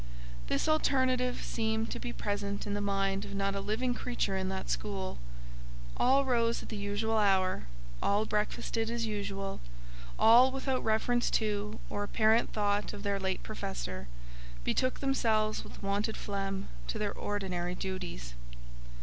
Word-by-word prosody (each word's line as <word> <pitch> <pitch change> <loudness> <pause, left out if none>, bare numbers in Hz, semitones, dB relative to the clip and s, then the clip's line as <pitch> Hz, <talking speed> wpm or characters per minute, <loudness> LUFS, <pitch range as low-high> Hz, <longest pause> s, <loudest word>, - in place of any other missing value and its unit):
This - - +1
alternative 260 -5 +2
seemed 220 0 0
to - - -3
be 240 - -4
present 200 -2 -2
in 205 - -2
the 205 - -1
mind 195 -1 +1
of 200 0 -6
not 195 0 +1
a 200 - -2
living 220 +5 0
creature 240 -5 -1
in 190 0 -1
that 190 0 -3
school. 195 -2 -2 0.8
All 270 +2 +4
rose 235 -2 +2
at - - -10
the 220 - -4
usual 205 +2 0
hour; 190 - +2 0.3
all 205 +2 +2
breakfasted 220 +1 -1
as 235 0 -1
usual; 200 -2 -3 0.6
all, 245 +4 +7
without 265 -1 -1
reference 235 +2 +2
to, 210 -1 0
or 205 - -3
apparent 220 +2 +3
thought 205 -1 +1
of 200 -1 -7
their 200 -1 0
late 190 -1 -1
Professor, 60 +1 -4 0.6
betook 255 - +1
themselves 220 -6 +2
with - - -11
wonted 205 +3 0
phlegm 195 -1 -3 0.2
to - - -2
their - - -1
ordinary 180 -3 -2
duties. 180 - -4
205 Hz, 150 wpm, -32 LUFS, 195-230 Hz, 0.8 s, all